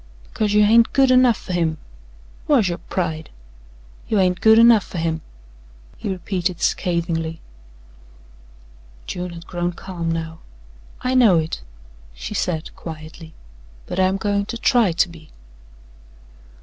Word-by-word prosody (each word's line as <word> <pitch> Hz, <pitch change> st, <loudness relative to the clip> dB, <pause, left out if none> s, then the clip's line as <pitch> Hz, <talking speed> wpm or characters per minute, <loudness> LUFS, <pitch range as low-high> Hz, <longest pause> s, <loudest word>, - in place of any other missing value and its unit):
Because 210 Hz, -, -2 dB
you 210 Hz, 0 st, +5 dB
hain't 230 Hz, +2 st, +4 dB
good 270 Hz, -1 st, +4 dB
enough 255 Hz, -3 st, +5 dB
fer 185 Hz, -, -7 dB
him! 165 Hz, -3 st, 0 dB, 0.7 s
Whar's 245 Hz, -11 st, +3 dB
yo' 175 Hz, -, -3 dB
pride? 160 Hz, -4 st, -4 dB, 0.8 s
You 215 Hz, -, 0 dB
hain't 185 Hz, -2 st, +2 dB
good 220 Hz, 0 st, +6 dB
enough 230 Hz, -3 st, +7 dB
fer -, -, -9 dB
him," 160 Hz, -1 st, -1 dB, 0.7 s
he -, -, -5 dB
repeated 180 Hz, -1 st, -2 dB
scathingly. 165 Hz, -3 st, -1 dB, 1.7 s
June 180 Hz, 0 st, -5 dB
had 170 Hz, 0 st, -10 dB
grown 175 Hz, 0 st, -3 dB
calm 170 Hz, -2 st, -5 dB
now. 160 Hz, 0 st, -4 dB, 0.6 s
"I 255 Hz, -, -1 dB
know 235 Hz, -9 st, +5 dB
it," 160 Hz, 0 st, -2 dB, 0.5 s
she -, -, -6 dB
said 160 Hz, -2 st, -3 dB
quietly, 160 Hz, 0 st, -10 dB, 0.5 s
"but -, -, -4 dB
I'm 190 Hz, +1 st, +2 dB
goin' 200 Hz, 0 st, -1 dB
to 235 Hz, -, -5 dB
try 235 Hz, -5 st, +3 dB
to 175 Hz, +3 st, +2 dB
be." 165 Hz, -3 st, -14 dB
180 Hz, 135 wpm, -21 LUFS, 165-210 Hz, 1.7 s, enough